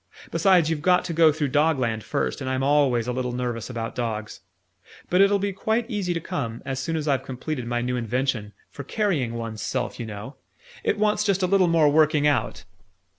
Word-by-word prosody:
Besides, 185 -5 +4
you've 160 -2 -1
got 180 +2 +3
to 170 - -3
go 160 -1 +5
through 150 -2 -2
Dogland 130 -7 +1
first, 65 -9 -2
and 130 - -3
I'm 130 0 -1
always 135 -5 +3
a 125 - -1
little 125 -1 -2
nervous 120 -2 -3
about 115 -2 -4
dogs. 110 -3 -4 0.7
But 180 +2 +4
it'll 200 +1 +5
be 200 0 -2
quite 220 +4 -1
easy 200 -4 -1
to - - -1
come, 115 -7 -4
as 135 -1 -3
soon 165 +5 -2
as 155 -1 -2
I've 135 -3 +2
completed 130 0 -5
my 120 0 -1
new 125 +1 -1
invention 120 -2 -2 0.2
for 140 - -8
carrying 145 - -1
one's 115 -2 -5
self, 125 -1 -3
you 115 - -4
know. 110 +6 -8 0.5
It - - +1
wants 210 0 +2
just 195 -2 +1
a - - +5
little 185 0 +3
more 165 -3 +4
working 150 -1 +3
out." 140 -6 0
140 Hz, 205 wpm, -24 LUFS, 120-170 Hz, 0.7 s, go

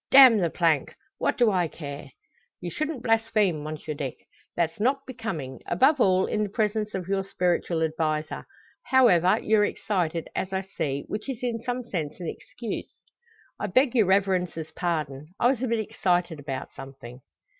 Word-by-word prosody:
Damn 260 -5 +9
the 175 -3 +1
plank! 160 -4 +1 0.2
What - - +1
do 240 -3 +4
I 180 -3 +2
care?" 145 -3 -8 0.5
"You 175 - -5
shouldn't 305 - -3
blaspheme, 220 -7 +2
Monsieur 155 0 -5
Dick. 140 -3 -4 0.4
That's 165 +1 0
not 270 +5 +1
becoming 210 - -5
above 275 +1 +4
all, 185 -2 +4
in 215 - -1
the 210 - -1
presence 210 0 -1
of 180 -2 -4
your 195 0 0
spiritual 175 -3 0
adviser. 155 -1 -2 0.4
However, 205 -10 +5
you're 215 -1 +4
excited, 175 -6 -1
as 190 0 -2
I 190 - 0
see, 145 -7 -3
which 210 +5 -5
is 250 -2 -5
in 235 -2 -1
some 245 +1 -3
sense 165 -10 -4
an 175 - -5
excuse." 235 +5 -6 0.6
"I 210 - -2
beg 255 +6 +3
your 225 -6 +4
Reverence's 185 -5 +1
pardon. 155 -2 -3
I 245 - +5
was 255 -3 -3
a 260 - 0
bit 230 0 +1
excited 180 -6 0
about 135 -2 -5
something." 130 -2 -10
185 Hz, 165 wpm, -26 LUFS, 160-225 Hz, 0.6 s, Damn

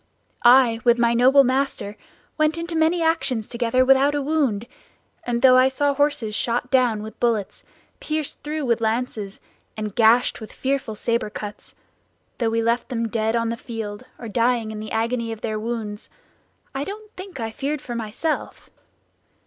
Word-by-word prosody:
"I, 240 -2 +6
with 240 -1 +4
my 235 0 +3
noble 260 +4 +6
master, 260 -5 -1 0.4
went 310 +1 +1
into 335 0 -4
many 325 +2 +2
actions 275 -9 0
together 245 +1 +1
without 270 +2 +4
a 290 - 0
wound; 270 -8 0 0.6
and 240 0 -1
though 255 -1 +8
I 255 0 +6
saw 280 +2 +1
horses 280 -6 0
shot 240 +3 -1
down 245 -5 +2
with 220 - -10
bullets, 225 -5 -1 0.4
pierced 310 -2 -3
through 300 0 -3
with 235 -2 +1
lances, 220 -3 -2 0.4
and 215 -2 -4
gashed 235 +2 +4
with 220 - -8
fearful 265 -5 -2
saber 230 0 -1
cuts; 210 0 -8 0.6
though 230 -2 +1
we 230 0 0
left 235 +2 0
them 230 -2 -2
dead 220 0 0
on 230 -1 0
the 230 - -2
field, 220 -3 -6
or 235 - -8
dying 230 0 +1
in 215 - -6
the 215 0 -7
agony 230 +1 -1
of 225 -1 -7
their 215 -1 -2
wounds, 215 -2 -5 0.6
I 270 +1 -2
don't 425 +4 -8
think 370 -5 -9
I 225 -1 -3
feared 285 +6 -3
for 245 - -7
myself. 235 +7 -4
240 Hz, 170 wpm, -23 LUFS, 225-275 Hz, 0.6 s, though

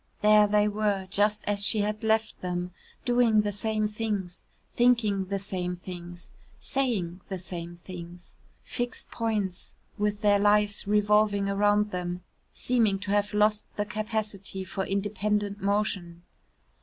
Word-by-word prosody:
There 210 0 +7
they 210 0 +3
were, 205 -2 0
just 210 +1 +2
as 205 0 +1
she 205 +1 +2
had 210 +2 -2
left 220 0 +1
them, 180 0 -3 0.3
doing 240 -3 +4
the 205 0 -1
same 215 +1 -1
things, 210 -4 -4 0.3
thinking 225 -5 +3
the 200 +1 -2
same 185 -2 -3
things, 175 -1 -10 0.3
saying 195 -10 -1
the 190 - -3
same 175 -1 -7
things 175 0 -10 0.3
fixed 245 0 -4
points 210 -5 -2 0.2
with 210 0 0
their 205 -1 +4
lives 205 0 +2
revolving 210 -1 +3
round 205 +1 +2
them, 180 0 -4 0.3
seeming 225 -5 +1
to 200 +1 -5
have 205 0 +1
lost 210 0 +3
the 205 - -1
capacity 210 -3 -3
for 190 +1 -4
independent 205 +1 -1
motion. 195 -4 -1
205 Hz, 135 wpm, -27 LUFS, 190-210 Hz, 0.3 s, There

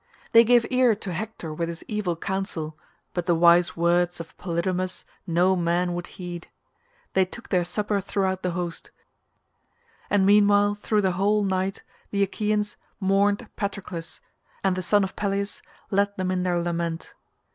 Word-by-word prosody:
They 230 0 +8
gave 240 0 +4
ear 250 -3 +4
to 200 -3 -6
Hector 185 -4 -5
with 165 +2 -2
his 165 -1 -7
evil 210 -5 -1
counsel, 165 -4 -3 0.4
but 175 0 -3
the 175 - +4
wise 170 +1 +5
words 175 +1 +2
of 165 -1 -9
Polydamas 180 +1 -2 0.2
no 180 +3 +3
man 175 0 +1
would 175 0 -4
heed. 175 -2 -6 0.7
They 190 - +4
took 210 +6 -9
their 180 -2 +2
supper 205 +3 -1
throughout 190 -1 -1
the 180 -1 -1
host, 175 -2 -4 1.2
and 200 -2 +3
meanwhile 205 0 +5
through 210 +1 0
the 190 - +3
whole 205 +3 +2
night 190 0 -1 0.3
the 200 -1 +1
Achaeans 210 +1 -1 0.2
mourned 200 +3 +2
Patroclus, 195 -5 -5 0.4
and 190 -1 +2
the 185 - -2
son 205 +3 +3
of 190 - -4
Peleus 200 -1 -2 0.3
led 200 +1 +1
them 185 -1 -1
in 185 -1 0
their 180 -1 +1
lament. 170 -1 -3
190 Hz, 155 wpm, -25 LUFS, 175-205 Hz, 1.2 s, They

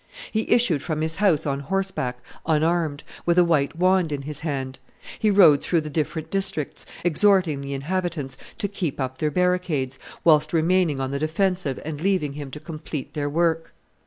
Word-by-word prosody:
He 220 0 -1
issued 190 - +3
from 155 -1 -2
his 160 0 -1
house 190 -7 +3
on 140 -1 -1
horseback, 140 -6 -2 0.3
unarmed, 160 -1 +1 0.2
with 170 0 +3
a 180 - +7
white 155 -3 +1
wand 180 -1 +2
in 140 -1 -3
his 150 0 -5
hand; 135 -4 -4 0.4
he 215 - +3
rode 175 -8 +6
through 170 -2 +1
the 155 0 -7
different 160 +1 -2
districts, 190 -7 -2 0.2
exhorting 175 -3 +3
the 140 0 -5
inhabitants 155 -2 -3 0.2
to 200 - -1
keep 185 -8 -4
up 130 -1 -3
their 155 - +1
barricades, 175 -6 0 0.2
whilst 155 -1 +4
remaining 165 -2 +2
on 135 0 -2
the 140 - -2
defensive 165 -2 0
and 150 -1 -5
leaving 185 -6 +1
him 145 -1 -6
to 150 - -7
complete 155 -2 -6
their 145 -1 -2
work. 165 +1 0
160 Hz, 175 wpm, -24 LUFS, 145-180 Hz, 0.4 s, a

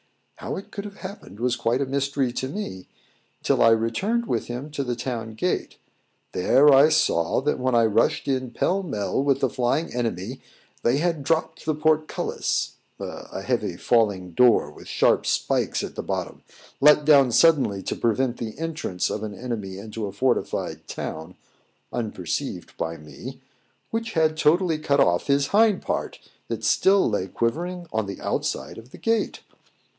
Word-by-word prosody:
How - - -5
it 195 - -8
could 200 -1 -6
have 205 -1 -9
happened 190 - -9
was 125 +1 +1
quite 120 +1 0
a - - +1
mystery 140 -1 -1
to 130 - -2
me, 115 - -6 0.6
till - - +2
I 115 - +7
returned 115 - +1
with - - -2
him 125 +5 -6
to 145 -1 -2
the 125 -2 -2
town 115 -2 -4
gate. 180 +11 -2 0.5
There 140 +10 +5
I 140 +3 +7
saw, 85 - +2
that 150 +2 0
when 130 -1 +1
I 115 -1 +5
rushed 115 +9 +1
in 130 -2 0
pell 190 +10 0
mell 135 - -2
with 140 -1 +1
the 135 - +2
flying 125 +6 0
enemy, 120 0 -3 0.4
they 120 +3 +2
had 165 -2 0
dropped 160 +3 -1
the 155 - +1
portcullis 155 0 0 0.2
(a - - -7
heavy - - -1
falling 100 -6 +1
door, 115 -7 +4
with - - -14
sharp - - +2
spikes - - 0
at - - -5
the - - -4
bottom, - - -4 0.4
let 150 +1 +6
down 140 -4 +6
suddenly 130 - +4
to - - -3
prevent 120 +2 0
the 110 0 -6
entrance 155 - -2
of 105 - -3
an 105 -2 -5
enemy 105 -5 -5
into 110 +1 -5
a - - -6
fortified 125 +5 -1
town) 80 +3 -6 0.6
unperceived 105 -8 -4
by 80 0 -3
me, 75 -1 -10 0.5
which 230 0 -3
had 160 -1 +2
totally 160 +1 +2
cut 140 -2 +1
off 90 -8 +3
his 140 0 +2
hind 210 -2 +4
part, - - -3 0.3
that - - -4
still 195 +1 +4
lay 100 -4 -1
quivering 175 - -2
on 110 -2 0
the 100 - -6
outside - - -3
of 115 +2 -15
the - - -12
gate. 225 -1 0
130 Hz, 170 wpm, -24 LUFS, 110-155 Hz, 0.6 s, I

